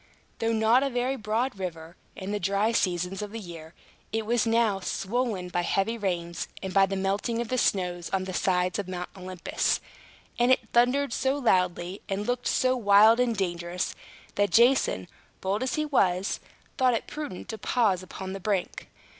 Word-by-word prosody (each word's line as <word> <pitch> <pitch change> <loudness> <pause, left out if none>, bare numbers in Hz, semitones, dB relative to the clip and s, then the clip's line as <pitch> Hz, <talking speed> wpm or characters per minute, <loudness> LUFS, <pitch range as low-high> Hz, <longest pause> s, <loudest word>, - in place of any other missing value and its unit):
Though 225 0 +1
not 225 +3 +4
a 275 - +1
very 250 +1 -1
broad 220 0 -2
river 170 -3 -6 0.2
in 190 +1 -5
the 210 - -1
dry 200 +4 +1
seasons 180 -3 0
of 210 -1 -5
the 225 - -5
year, 165 -4 -10 0.4
it 220 0 -1
was 235 +1 +1
now 225 -3 +2
swollen 195 0 -2
by 175 - 0
heavy 195 +5 0
rains 175 -5 -3 0.2
and 190 -1 -4
by 195 -1 +5
the 195 - -3
melting 195 +5 -1
of 235 -1 -3
the 255 - 0
snow 180 -4 +1
on 190 -1 0
the 185 0 -5
sides 180 +1 +1
of 200 - -3
Mount 180 -1 -5
Olympus; 185 -2 -1 0.6
and 240 +1 +4
it 245 -3 +2
thundered 250 +2 +3
so 265 +1 +1
loudly, 180 -6 +1
and 200 +1 -2
looked 245 +1 -1
so 255 0 +2
wild 215 0 +6
and 240 -3 +1
dangerous, 175 -1 -2 0.4
that 205 0 +1
Jason, 235 - +3 0.3
bold 195 +3 -1
as 260 - -1
he 305 - 0
was, 195 -10 +1 0.4
thought 255 -2 +4
it - - -3
prudent 295 -12 -6
to 220 - -5
pause 205 -7 +1
upon 190 0 -7
the 195 - -5
brink. 195 -1 -2
200 Hz, 180 wpm, -27 LUFS, 185-235 Hz, 0.6 s, wild